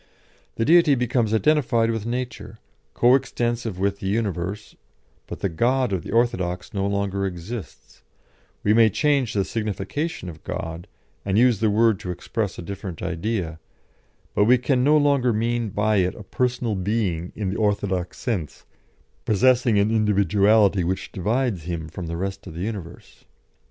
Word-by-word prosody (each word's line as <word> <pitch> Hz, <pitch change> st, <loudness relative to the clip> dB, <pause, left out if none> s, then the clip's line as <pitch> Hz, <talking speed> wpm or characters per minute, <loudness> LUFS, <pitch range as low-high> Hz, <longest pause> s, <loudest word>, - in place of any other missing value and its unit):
The 115 Hz, -, 0 dB
Deity 165 Hz, -2 st, +6 dB
becomes 120 Hz, -3 st, 0 dB
identified 115 Hz, -2 st, +2 dB
with 115 Hz, -1 st, -3 dB
nature, 120 Hz, -3 st, -5 dB, 0.4 s
co 120 Hz, +1 st, +5 dB
extensive 120 Hz, -5 st, -1 dB
with 100 Hz, +1 st, -1 dB
the 95 Hz, -, -4 dB
universe, 100 Hz, -1 st, -2 dB, 0.5 s
but -, -, -8 dB
the -, -, +1 dB
God 120 Hz, +6 st, +1 dB
of 90 Hz, -, -1 dB
the -, -, -10 dB
orthodox 95 Hz, -6 st, 0 dB
no 100 Hz, -1 st, -1 dB
longer 100 Hz, -1 st, -1 dB
exists; 95 Hz, +4 st, -7 dB, 0.6 s
we 105 Hz, -, +3 dB
may 110 Hz, 0 st, +6 dB
change 140 Hz, +1 st, +1 dB
the 100 Hz, -2 st, +1 dB
signification 110 Hz, -, -3 dB
of 80 Hz, -3 st, -9 dB
God, 85 Hz, -2 st, -5 dB, 0.4 s
and 100 Hz, 0 st, 0 dB
use 120 Hz, -3 st, +4 dB
the 110 Hz, -, +2 dB
word 110 Hz, -1 st, +3 dB
to 90 Hz, -, -7 dB
express 100 Hz, +3 st, -3 dB
a -, -, -6 dB
different 95 Hz, -2 st, -7 dB
idea, 90 Hz, -2 st, -3 dB, 0.7 s
but 105 Hz, -, +3 dB
we 125 Hz, +3 st, +6 dB
can 125 Hz, +1 st, +1 dB
no 150 Hz, +3 st, +5 dB
longer 140 Hz, -4 st, +3 dB
mean 115 Hz, +1 st, 0 dB
by 105 Hz, +2 st, +1 dB
it 90 Hz, 0 st, +1 dB
a 105 Hz, -, -10 dB
Personal 120 Hz, +1 st, -1 dB
Being 95 Hz, -3 st, -1 dB
in 100 Hz, -3 st, -2 dB
the 100 Hz, -, -3 dB
orthodox 100 Hz, -4 st, -1 dB
sense, 95 Hz, -, -4 dB, 0.6 s
possessing 120 Hz, +1 st, +3 dB
an 100 Hz, +2 st, +2 dB
individuality 105 Hz, -1 st, +3 dB
which 95 Hz, +2 st, -3 dB
divides 105 Hz, -, -1 dB
Him 85 Hz, -3 st, -4 dB
from 85 Hz, +2 st, -7 dB
the 85 Hz, +1 st, -4 dB
rest 95 Hz, +2 st, -4 dB
of 80 Hz, -, -9 dB
the 85 Hz, -, -5 dB
universe." 95 Hz, -5 st, -7 dB
105 Hz, 160 wpm, -23 LUFS, 95-120 Hz, 0.7 s, Deity